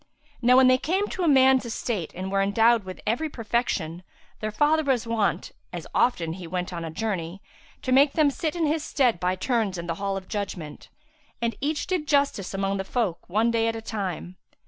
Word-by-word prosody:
Now 250 Hz, +1 st, +5 dB
when 260 Hz, -, +7 dB
they 255 Hz, 0 st, +5 dB
came 380 Hz, +8 st, 0 dB
to 360 Hz, -3 st, -1 dB
man's 265 Hz, -2 st, +5 dB
estate 220 Hz, -6 st, -3 dB
and 190 Hz, +2 st, -4 dB
were 195 Hz, 0 st, +2 dB
endowed 225 Hz, +2 st, +3 dB
with 185 Hz, 0 st, -8 dB
every 275 Hz, +9 st, 0 dB
perfection, 225 Hz, -, -2 dB, 0.4 s
their 215 Hz, -, -2 dB
father 300 Hz, +8 st, +2 dB
was 265 Hz, -5 st, +1 dB
wont, 225 Hz, -3 st, 0 dB, 0.2 s
as -, -, -6 dB
often 170 Hz, -10 st, +1 dB
as 180 Hz, -, -9 dB
he 175 Hz, -, -7 dB
went 180 Hz, +1 st, -3 dB
on 170 Hz, -1 st, -4 dB
a 165 Hz, -, -4 dB
journey, 185 Hz, -1 st, -3 dB, 0.4 s
to 255 Hz, -, -2 dB
make 275 Hz, +2 st, +5 dB
them 300 Hz, -3 st, +3 dB
sit 315 Hz, +4 st, -3 dB
in 335 Hz, -2 st, +1 dB
his 305 Hz, +1 st, 0 dB
stead 250 Hz, -, +1 dB
by 180 Hz, +1 st, 0 dB
turns 215 Hz, -2 st, 0 dB
in 170 Hz, -, -5 dB
the 165 Hz, -1 st, -2 dB
hall 195 Hz, -1 st, -1 dB
of 190 Hz, -1 st, -8 dB
judgement; 190 Hz, -7 st, -5 dB, 0.5 s
and 230 Hz, -2 st, -1 dB
each 295 Hz, +2 st, -1 dB
did 360 Hz, -5 st, -2 dB
justice 280 Hz, -10 st, +1 dB
among 195 Hz, 0 st, -1 dB
the 190 Hz, -, -2 dB
folk 195 Hz, -6 st, -2 dB
one 220 Hz, +5 st, +2 dB
day 230 Hz, -1 st, +1 dB
at 225 Hz, -, -1 dB
a -, -, -4 dB
time. 185 Hz, -4 st, -4 dB
225 Hz, 210 wpm, -25 LUFS, 190-265 Hz, 0.5 s, when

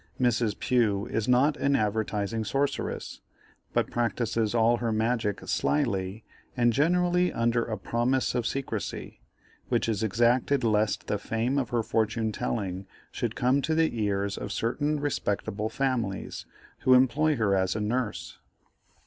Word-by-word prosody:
Mrs. 120 Hz, -4 st, +1 dB
Pugh 110 Hz, -5 st, +1 dB
is 110 Hz, -1 st, -2 dB
not 130 Hz, +4 st, +3 dB
an 140 Hz, 0 st, +2 dB
advertising 110 Hz, 0 st, -1 dB
sorceress, 140 Hz, +6 st, -2 dB, 0.5 s
but -, -, 0 dB
practises 115 Hz, -2 st, 0 dB
all 115 Hz, +1 st, +4 dB
her 115 Hz, -1 st, -1 dB
magic 110 Hz, -1 st, 0 dB
slily, 110 Hz, -7 st, 0 dB, 0.3 s
and 120 Hz, -1 st, +3 dB
generally 180 Hz, +5 st, +2 dB
under 115 Hz, 0 st, +1 dB
a 110 Hz, -2 st, -4 dB
promise 120 Hz, +6 st, 0 dB
of 120 Hz, -2 st, 0 dB
secresy, 135 Hz, -1 st, -4 dB, 0.5 s
which -, -, +1 dB
is 110 Hz, -3 st, -1 dB
exacted 120 Hz, +5 st, +2 dB
lest 105 Hz, -2 st, +1 dB
the 105 Hz, -, -1 dB
fame 120 Hz, +5 st, -1 dB
of 125 Hz, -4 st, -2 dB
her 120 Hz, -2 st, 0 dB
fortune 110 Hz, +1 st, 0 dB
telling 95 Hz, -3 st, -3 dB, 0.2 s
should 120 Hz, -4 st, -3 dB
come 130 Hz, +3 st, +2 dB
to 160 Hz, +4 st, 0 dB
the 160 Hz, -5 st, +2 dB
ears 100 Hz, -1 st, -1 dB
of 105 Hz, -, -5 dB
certain 145 Hz, +8 st, -1 dB
respectable 110 Hz, -6 st, -2 dB
families, 120 Hz, -8 st, -2 dB, 0.3 s
who 130 Hz, -, +5 dB
employ 140 Hz, +5 st, +3 dB
her 105 Hz, -5 st, +2 dB
as 95 Hz, 0 st, +1 dB
a -, -, -1 dB
nurse. 115 Hz, +2 st, -3 dB
115 Hz, 140 wpm, -27 LUFS, 105-130 Hz, 0.5 s, who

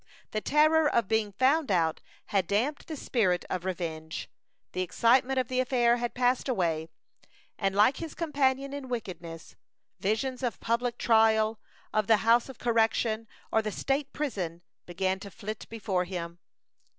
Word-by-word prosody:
The 215 Hz, -, -2 dB
terror 310 Hz, +3 st, +4 dB
of 235 Hz, -4 st, +1 dB
being 220 Hz, -1 st, +1 dB
found 270 Hz, +7 st, +2 dB
out 165 Hz, -4 st, +1 dB, 0.3 s
had 190 Hz, -4 st, +2 dB
damped 245 Hz, -, 0 dB
the 315 Hz, -, -5 dB
spirit 190 Hz, -10 st, 0 dB
of 185 Hz, -1 st, -2 dB
revenge. 160 Hz, -4 st, -4 dB, 0.4 s
The 185 Hz, -, -2 dB
excitement 245 Hz, +8 st, +3 dB
of 255 Hz, -2 st, +1 dB
the 255 Hz, -1 st, -1 dB
affair 245 Hz, -2 st, +3 dB
had 240 Hz, 0 st, -3 dB
passed 250 Hz, +2 st, +1 dB
away, 165 Hz, -8 st, 0 dB, 0.7 s
and 195 Hz, -1 st, 0 dB
like 210 Hz, +6 st, +4 dB
his 325 Hz, -3 st, -6 dB
companion 275 Hz, -4 st, 0 dB
in 280 Hz, -2 st, -6 dB
wickedness, 170 Hz, -8 st, -6 dB, 0.4 s
visions 245 Hz, +6 st, -1 dB
of 245 Hz, -3 st, -2 dB
public 235 Hz, +1 st, -1 dB
trial, 220 Hz, -1 st, +3 dB, 0.3 s
of 215 Hz, -1 st, +1 dB
the 225 Hz, -1 st, +6 dB
house 235 Hz, +3 st, +4 dB
of 265 Hz, -, -9 dB
correction, 225 Hz, -1 st, +1 dB, 0.2 s
or 220 Hz, -, +3 dB
the 215 Hz, -1 st, -3 dB
state 275 Hz, +5 st, -1 dB
prison, 180 Hz, -, -3 dB, 0.2 s
began 190 Hz, +2 st, -1 dB
to 200 Hz, 0 st, -8 dB
flit 215 Hz, +2 st, -7 dB
before 195 Hz, -5 st, -1 dB
him. 175 Hz, -2 st, -6 dB
225 Hz, 155 wpm, -29 LUFS, 190-255 Hz, 0.7 s, the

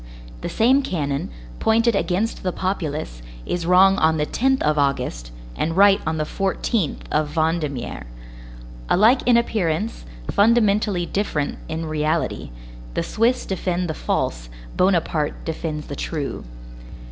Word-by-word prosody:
The -, -, -3 dB
same 260 Hz, +5 st, +3 dB
cannon, 145 Hz, -, -2 dB, 0.3 s
pointed 230 Hz, 0 st, +3 dB
against 195 Hz, +4 st, -1 dB
the 185 Hz, -, -1 dB
populace, 155 Hz, -, -3 dB, 0.2 s
is 170 Hz, -1 st, -2 dB
wrong 190 Hz, +2 st, +6 dB
on 160 Hz, 0 st, +3 dB
the 150 Hz, -, +1 dB
10th 265 Hz, +9 st, +1 dB
of 150 Hz, 0 st, +2 dB
August, 125 Hz, -, -1 dB, 0.2 s
and 165 Hz, +2 st, -2 dB
right 200 Hz, 0 st, +6 dB
on 160 Hz, 0 st, 0 dB
the 155 Hz, -, 0 dB
14th 195 Hz, +2 st, -1 dB
of 150 Hz, -1 st, 0 dB
Vendémiaire. 155 Hz, -, -1 dB, 0.8 s
Alike 225 Hz, +8 st, +5 dB
in 240 Hz, -1 st, +6 dB
appearance, 210 Hz, -3 st, -1 dB, 0.3 s
fundamentally 210 Hz, -4 st, +3 dB
different 165 Hz, -7 st, -2 dB
in 160 Hz, +1 st, -4 dB
reality; 155 Hz, 0 st, -1 dB, 0.5 s
the -, -, 0 dB
Swiss 235 Hz, +3 st, +1 dB
defend 180 Hz, -1 st, -2 dB
the 160 Hz, -, -2 dB
false, -, -, -2 dB, 0.3 s
Bonaparte 170 Hz, -5 st, +1 dB
defends 155 Hz, -2 st, -4 dB
the 140 Hz, -, -6 dB
true. 145 Hz, -, -4 dB
175 Hz, 130 wpm, -22 LUFS, 150-205 Hz, 0.8 s, wrong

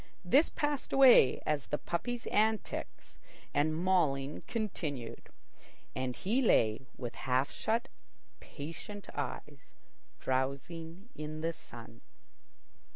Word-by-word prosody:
This 275 Hz, -, +5 dB
passed 295 Hz, -2 st, -2 dB
away 255 Hz, -, +7 dB
as 150 Hz, -3 st, 0 dB
the 150 Hz, -, -1 dB
puppies' 235 Hz, +11 st, -3 dB
antics 220 Hz, +1 st, -1 dB, 0.3 s
and 155 Hz, +2 st, +2 dB
mauling 155 Hz, -6 st, +1 dB
continued, 155 Hz, -, -4 dB, 0.7 s
and 130 Hz, -1 st, -2 dB
he 230 Hz, +8 st, +1 dB
lay 115 Hz, -, +3 dB
with 120 Hz, -2 st, -5 dB, 0.2 s
half 130 Hz, +2 st, +2 dB
shut 230 Hz, +4 st, -1 dB, 0.5 s
patient 170 Hz, +8 st, -8 dB
eyes, 145 Hz, +1 st, -6 dB, 0.4 s
drowsing 160 Hz, -, -3 dB
in 155 Hz, 0 st, -6 dB
the 165 Hz, +1 st, 0 dB
sun. 120 Hz, -6 st, -12 dB
155 Hz, 100 wpm, -32 LUFS, 135-210 Hz, 0.7 s, away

